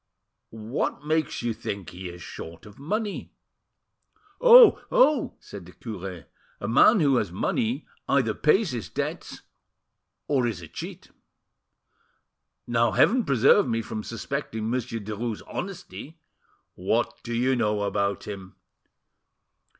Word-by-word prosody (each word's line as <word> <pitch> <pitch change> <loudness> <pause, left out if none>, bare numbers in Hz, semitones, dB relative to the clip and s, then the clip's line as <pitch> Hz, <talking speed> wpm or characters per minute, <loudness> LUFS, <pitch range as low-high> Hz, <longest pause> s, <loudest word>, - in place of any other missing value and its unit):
What 115 +6 -3
makes 155 -5 -1
you 120 -1 0
think 100 -4 -6
he 90 +1 -7
is 85 0 -10
short 80 0 -9
of 105 +2 -14
money?" 205 +8 -3 1.1
"Oh! - - +9
oh!" 305 - +3
said 95 -4 -11
the 90 - -14
cure, 95 -6 -7 0.3
"a 100 - -4
man 180 - +5
who 140 -4 +4
has 100 -7 -1
money 115 - -1 0.2
either 130 -6 +2
pays 165 - +2
his 110 -8 -5
debts, - - -5 0.8
or 130 -4 +2
is 110 -6 -3
a 85 - -10
cheat. - - -9 1.5
Now 120 -2 +1
Heaven 235 - +4
preserve 135 - +4
me 115 -1 -1
from 110 0 -5
suspecting 115 -1 -4
Monsieur 125 -2 -2
Derues' 110 +2 -4
honesty!" 160 - -7 0.6
"What 110 +6 -1
do 120 0 -4
you 130 +3 +2
know 105 -3 0
about 100 0 -1
him?" 95 -2 -8
115 Hz, 125 wpm, -26 LUFS, 100-140 Hz, 1.5 s, Oh